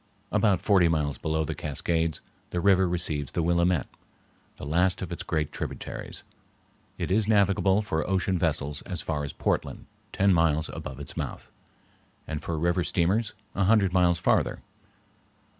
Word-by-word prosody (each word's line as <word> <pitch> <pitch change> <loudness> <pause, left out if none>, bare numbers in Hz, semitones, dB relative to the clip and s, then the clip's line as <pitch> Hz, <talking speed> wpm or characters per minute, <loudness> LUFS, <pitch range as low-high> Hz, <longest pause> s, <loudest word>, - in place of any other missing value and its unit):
About 100 -6 +2
forty 95 -4 +4
miles 75 -5 0
below 80 0 -1
the 80 - -3
Cascades 80 0 -1 0.3
the 90 - -2
river 95 -1 +4
receives 80 -5 -1
the 85 - 0
Willamette, 85 -1 +2 0.7
the - - -7
last 90 +5 +2
of - - -6
its - - -4
great 80 -2 -2
tributaries. - - -6 0.7
It - - -3
is 105 +1 +2
navigable 100 -1 +3
for 80 -4 -2
ocean 95 -1 +1
vessels 75 -4 -1
as 90 -4 -3
far 75 -3 -2
as 70 - -4
Portland, - - -2 0.3
ten 100 0 +3
miles 80 -2 +2
above 65 0 -7
its 70 - -7
mouth, - - -5 0.7
and 75 - -4
for 85 - -3
river 85 +3 +1
steamers 100 +8 +1 0.2
a 100 - +1
hundred 100 -3 +3
miles 90 -2 +4
farther. 85 - +1
85 Hz, 155 wpm, -27 LUFS, 80-95 Hz, 0.7 s, forty